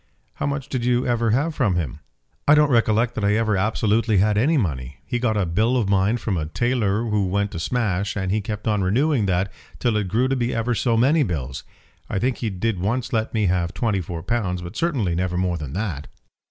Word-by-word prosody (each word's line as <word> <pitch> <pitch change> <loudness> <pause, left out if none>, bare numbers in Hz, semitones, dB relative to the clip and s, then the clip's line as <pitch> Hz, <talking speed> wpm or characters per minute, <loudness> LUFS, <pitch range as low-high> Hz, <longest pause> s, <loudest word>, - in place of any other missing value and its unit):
"How - - -1
much 140 -1 -3
did 130 -3 -3
you 125 0 +2
ever 115 -2 +1
have 145 +9 +1
from 120 -11 +1
him?" 75 -5 -3 0.5
"I 145 - +7
don't 150 -1 +4
recollect 115 0 +2
that 110 - -4
I 100 +1 +3
ever 110 -2 +1
absolutely 110 +2 +1
had 105 +2 +3
any 145 +10 +3
money. 70 - -2
He 120 -2 -2
got 110 -3 +1
a 100 - +1
bill 110 +9 +1
of 115 -5 0
mine 100 +4 +2
from 105 -5 -2
a 75 -2 -2
tailor 115 +2 0
who 105 -4 0
went 100 +2 0
to 85 - -5
smash, 100 -1 -1
and 95 -2 -1
he 105 +1 +1
kept 105 +1 -5
on 105 -2 +1
renewing 120 +4 +2
that 95 +1 0 0.3
till 120 -3 0
it 105 -2 -1
grew 115 +7 +1
to 135 - 0
be 120 -1 -1
ever 115 +2 0
so 115 0 +1
many 140 +7 +4
bills. 70 - -3 0.5
I - - -2
think 125 +5 0
he 115 - -2
did 100 +1 -2
once 120 +7 -1
let 110 -1 0
me 110 -2 +2
have 90 -1 0
twenty 105 -4 0
four 85 -1 -6
pounds, 95 -4 -1
but 90 +4 -8
certainly 135 - 0
never 90 +1 -1
more 90 -1 0
than 70 -3 -6
that." 90 -8 -3
105 Hz, 230 wpm, -23 LUFS, 95-120 Hz, 0.5 s, I